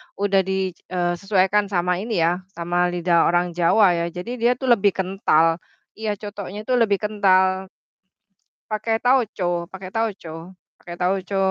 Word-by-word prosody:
udah 200 -1 +2
di 190 -1 -1 0.2
eee, 175 -1 0
sesuaikan 200 +1 +2
sama 180 0 +1
ini 210 -2 -2
ya, 175 +3 0
sama 175 +1 0
lidah 175 -1 +2
orang 175 +1 +1
Jawa 180 +5 +4
ya, 170 - -1
jadi 180 +7 -6
dia 240 +1 +4
tuh 260 - -2
lebih 200 -3 +2
kental, 175 -4 +2 0.4
iya, 215 -1 -2
cotonya 205 -1 -7
itu 255 +3 -2
lebih 215 -4 +3
kental. 190 -2 +2 1.0
Pake 225 +1 -1
tauco 195 -9 +1
pake 190 -1 -9
tauco 190 -6 -4 0.2
pake 175 0 -9
tauco. 190 +2 -1
190 Hz, 145 wpm, -22 LUFS, 175-210 Hz, 1.0 s, Jawa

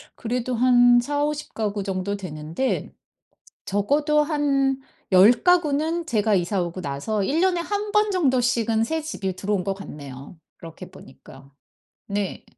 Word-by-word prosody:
그래도 245 +2 -3
한 245 0 +5
40-50 290 +3 -3
가구 210 -2 -2
정도 195 +1 -3
되는데 165 - -3 0.7
적어도 290 +10 +1
한 280 -3 +1 0.3
10 190 +3 +7
가구는 335 -1 +2
제가 220 -8 +1
이사 185 +1 0
오고 175 +1 -5
나서 145 +9 -2
1 295 +10 0
년에 365 -1 +2
1 410 +3 -3
번 420 -1 +3
정도씩은 245 - +1
새집이 295 - -3
들어온 195 -1 -1
것 195 - -1
같네요. 145 -6 -10 0.2
그렇게 165 -1 -11
보니까. 135 +1 -15 0.6
네. 200 -1 -3
235 Hz, 240 characters per minute, -23 LUFS, 190-295 Hz, 0.7 s, 10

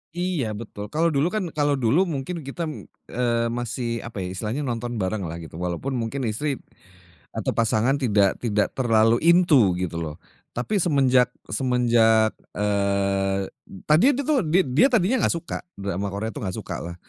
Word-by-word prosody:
Iya 175 -6 -1
betul 105 -1 -7
kalau 165 +2 +2
dulu 145 +2 +2
kan 215 +2 -1
kalau 145 -1 +2
dulu 160 +12 +3
mungkin 160 +3 -4
kita, 170 +5 -4 0.5
eee, 115 -1 +1
masih 120 0 -3
apa 105 -5 -5
ya - - -3
istilahnya 110 +9 -3
nonton 120 -2 -3
bareng 100 0 -2
lah 80 - -5
gitu 80 - -11
walaupun 90 +9 -3
mungkin 120 +4 -3
istri, 140 +6 -2 0.8
atau - - -1
pasangan 115 +3 +2
tidak 105 -7 +2
tidak 105 -3 +1
terlalu 115 -2 +4
into 160 - +5
gitu 90 -2 -3
loh. 75 -2 -5 0.4
Tapi 165 - -1
semenjak 135 -6 +4 0.2
semenjak, 115 -2 +3 0.2
eee, 100 -1 +1 0.5
tadinya 165 - +5
itu 285 - -1
tuh 300 -2 +3
did 175 +4 +3
dia 155 - +6
tadinya 235 +2 +2
enggak - - +2
suka 165 - -5 0.2
drama 100 0 -2
Korea 105 +3 -3
itu - - -6
enggak 95 -4 -3
sukalah, 85 0 -6
120 Hz, 160 wpm, -24 LUFS, 105-145 Hz, 0.8 s, dia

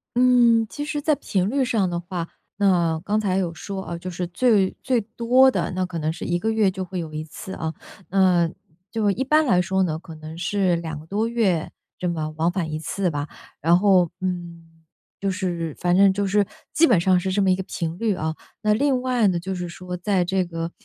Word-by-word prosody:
嗯， 240 -2 +5
其 290 - -5
实 295 -1 -3
在 305 - +2
频 190 -5 -1
率 275 +2 +1
上 215 -7 +1
的 170 0 -2
话， 175 -1 -5 0.3
那 175 -5 +2
刚 210 +1 +1
才 195 -3 0
有 175 -3 -1
说 195 +1 -6
哦， 170 - -4
就 180 +2 -6
是 180 0 -3
最 200 +1 +2
最 255 -3 +1
多 240 +5 +4
的， - - -1
那 185 0 -1
可 175 -2 -5
能 155 +1 0
是 165 - -6
1 175 0 0
个 220 +3 0
月 215 -4 +3
就 190 0 -4
会 185 0 -5
有 160 -2 -6
1 155 0 -3
次 190 +4 -9
啊。 160 0 -3 0.4
那， 180 -3 +3 0.4
就 215 -3 +1
一 260 +7 -1
般 305 +3 +3
来 180 -8 +4
说 190 +1 +1
呢， 160 -3 -1
可 165 -2 -11
能 155 +1 -9
是 185 0 +1
两 160 -3 -5
个 155 - -13
多 210 +6 -1
月 205 -9 0 0.3
这 180 - -1
么 155 -2 -3
往 165 +2 +2
返 170 -4 -2
一 155 - -3
次 185 +3 -1
吧。 145 0 -3 0.3
然 170 +3 +5
后 185 -4 +4
嗯， 170 -3 -6 0.4
就 195 - -1
是 175 -5 -3
反 175 0 +2
正 195 0 +6
就 200 +1 -1
是 200 +1 +2 0.3
基 330 - +5
本 220 -9 +4
上 185 +1 +3
是 190 +1 -2
这 200 - +1
么 190 -1 +3
一 - - +4
个 190 - -4
频 165 -2 -4
率 220 -4 +1
啊。 160 -1 -2 0.3
那 210 0 +4
另 265 +2 +2
外 250 -4 +2
呢 175 -2 +1
就 190 +2 -4
是 180 -1 -4
说， 180 +1 -7
在 180 0 0
这 190 +1 +1
个， 165 -1 -5
185 Hz, 240 characters per minute, -23 LUFS, 170-210 Hz, 0.4 s, 正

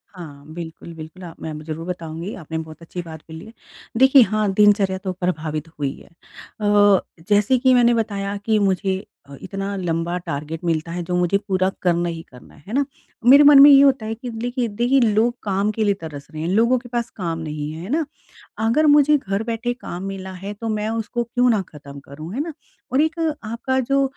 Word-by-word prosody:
हाँ, 145 -5 -10
बिल्कुल, 170 0 -8
बिल्कुल, 160 +3 -10
आप 165 -2 -10
मैं 160 - -5
ज़रूर 160 +1 -5
बताऊँगी। 170 +2 -5
आपने 160 -2 -6
बहुत 160 0 -8
अच्छी 175 +2 -6
बात 160 -2 -9
बोली 160 0 -9
है। 225 - -13 0.4
देखिए, 265 +1 +7
हाँ, 215 -2 +1
दिनचर्या 205 -2 +4
तो 190 -1 -4
प्रभावित 160 -4 -3
हुई 140 -1 -1
है। - - -17
अ, 205 +3 +1 0.3
जैसे 210 +5 +4
कि 255 +1 +4
मैंने 240 -1 +5
बताया 200 -3 -2
कि 220 -1 +2
मुझे 190 0 0 0.2
अ, 140 - -9
इतना 195 0 -4
लंबा 170 -1 -2
टारगेट 155 -1 -5
मिलता 165 0 -1
है, 175 - -3
जो 180 +1 -3
मुझे 180 +2 +2
पूरा 185 -1 +1
करना 175 -1 +1
ही 165 -1 -5
करना 125 -1 -16
है। - - -20
है 220 - -7
ना? 280 +1 +2 0.4
मेरे 285 +2 +9
मन 290 -1 +8
में 290 - +10
ये 275 -1 +8
होता 270 -5 +3
है 220 - -2
कि 245 +2 -7
लेखिए 245 -1 -1
देखिए, 240 +6 +2
लोग 230 +1 +2
काम 200 +1 0
के 220 +1 -1
लिए 205 -1 +3
तरस 145 -3 -8
रहे 155 0 -6
हैं। 165 - -2
लोगों 230 +6 +3
के 245 - -13
पास 235 -1 -2
काम 165 -4 -3
नहीं 150 -1 -5
है, 160 +1 -8
है 190 - -8
ना? 310 +3 0 0.6
अगर 300 +7 +3
मुझे 295 0 +6
घर 195 -3 -3
बैठे 240 +2 -2
काम 180 -8 -7
मिला 190 -1 -6
है, 195 +2 -7
तो 225 +2 -5
मैं 215 0 -1
उसको 230 +1 -2
क्यों 245 +2 +1
ना 215 -4 +2
ख़त्म 140 -2 -11
करूँ, 155 +5 -10
है 265 - -2
ना? 325 +2 -3 0.4
और 265 - +3
एक 315 +2 0 0.2
आपका, 235 +4 -2
जो 275 +2 +1
195 Hz, 215 wpm, -21 LUFS, 165-235 Hz, 0.6 s, में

